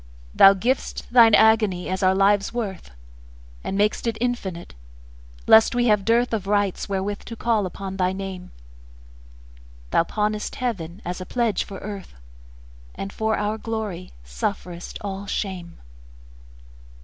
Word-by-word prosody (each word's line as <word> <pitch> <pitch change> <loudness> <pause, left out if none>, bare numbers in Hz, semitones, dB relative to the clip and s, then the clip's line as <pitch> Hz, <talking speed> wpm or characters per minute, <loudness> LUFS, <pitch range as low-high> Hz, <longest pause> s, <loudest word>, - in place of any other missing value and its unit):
Thou 195 0 +8
giv'st 245 +7 -2
Thine 230 -3 +8
agony 215 -5 +3
as 185 0 -2
our 190 0 +3
life's 200 +1 +3
worth, 205 - -5 0.7
And 195 - -3
mak'st 210 +3 +1
it 225 -1 -1
infinite, 210 -8 -3 0.7
lest 220 +2 +6
we 240 -1 +2
have 210 -2 +2
dearthOf 230 -3 +1
rights 205 -1 0
wherewith 200 +1 -2
to 230 - -7
call 225 -4 0
upon 190 +1 -7
thy 185 -1 +1
Name; 190 -1 -6 1.4
Thou - - +4
pawnest 210 +3 -2
Heaven 195 -7 -4
as 180 +1 -4
a - - -5
pledge 235 -5 0
for 195 - -9
Earth, 200 -1 -8 0.8
And 195 - -6
for 220 0 0
our 210 +1 -2
glory 215 -6 -5
sufferest 165 - -5
all 200 0 -5
shame. 185 -4 -4
200 Hz, 135 wpm, -23 LUFS, 190-220 Hz, 1.4 s, Thou